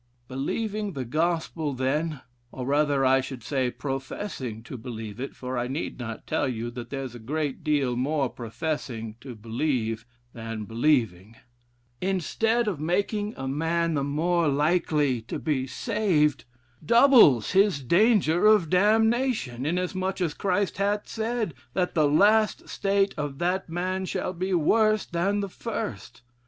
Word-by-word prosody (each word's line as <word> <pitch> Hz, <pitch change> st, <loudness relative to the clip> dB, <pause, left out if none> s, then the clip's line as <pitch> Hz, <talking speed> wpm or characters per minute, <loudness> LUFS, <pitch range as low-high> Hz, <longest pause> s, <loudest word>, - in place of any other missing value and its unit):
Believing 205 Hz, -, -3 dB
the 130 Hz, -3 st, -4 dB
gospel, 160 Hz, +1 st, -1 dB
then, 145 Hz, +3 st, -1 dB, 0.3 s
(or 125 Hz, -, -6 dB
rather, 145 Hz, 0 st, +2 dB
I 130 Hz, +1 st, +4 dB
should 130 Hz, -3 st, -7 dB
say, 130 Hz, -1 st, 0 dB
professing 135 Hz, -, -5 dB
to 125 Hz, -, -8 dB
believe 110 Hz, -3 st, -7 dB
it, 135 Hz, -, -5 dB
for 130 Hz, -1 st, -4 dB
I 120 Hz, -, -1 dB
need 135 Hz, +2 st, -4 dB
not 115 Hz, -2 st, -6 dB
tell 145 Hz, -, 0 dB
you 120 Hz, -1 st, -3 dB
that 120 Hz, 0 st, -8 dB
there's 135 Hz, -3 st, -5 dB
a 120 Hz, -, -9 dB
great 145 Hz, +4 st, -3 dB
deal 140 Hz, -5 st, +1 dB
more 140 Hz, +2 st, 0 dB
professing 120 Hz, -2 st, -4 dB
to 130 Hz, -3 st, -8 dB
believe, 115 Hz, 0 st, -2 dB, 0.3 s
than 115 Hz, -2 st, -6 dB
believing,) 115 Hz, -5 st, 0 dB, 0.7 s
instead 215 Hz, +5 st, 0 dB
of 185 Hz, -8 st, -1 dB
making 205 Hz, +6 st, -1 dB
a 135 Hz, -, -4 dB
man 165 Hz, +4 st, 0 dB
the 140 Hz, -2 st, 0 dB
more 165 Hz, +4 st, +1 dB
likely 150 Hz, -3 st, +1 dB
to -, -, -3 dB
be 135 Hz, -4 st, -1 dB
saved, 165 Hz, -, +1 dB, 0.4 s
doubles 235 Hz, -, +6 dB
his 190 Hz, -7 st, +3 dB
danger 185 Hz, -, +4 dB
of 210 Hz, -7 st, +4 dB
damnation, 215 Hz, -, +2 dB
inasmuch 185 Hz, +3 st, -1 dB
as 170 Hz, -5 st, 0 dB
Christ 195 Hz, +1 st, -1 dB
hath 205 Hz, +1 st, 0 dB
said, 225 Hz, -4 st, -2 dB, 0.2 s
that 180 Hz, -1 st, 0 dB
'the 155 Hz, -3 st, +3 dB
last 210 Hz, +8 st, +3 dB
state 195 Hz, 0 st, +1 dB
of 145 Hz, -2 st, -3 dB
that 180 Hz, +2 st, -1 dB
man 185 Hz, +3 st, -2 dB
shall 185 Hz, -, -3 dB
be 185 Hz, +2 st, -3 dB
worse 215 Hz, +5 st, +3 dB
than 195 Hz, +4 st, 0 dB
the 200 Hz, -, -2 dB
first.' 225 Hz, -, -6 dB
155 Hz, 145 wpm, -26 LUFS, 130-190 Hz, 0.7 s, doubles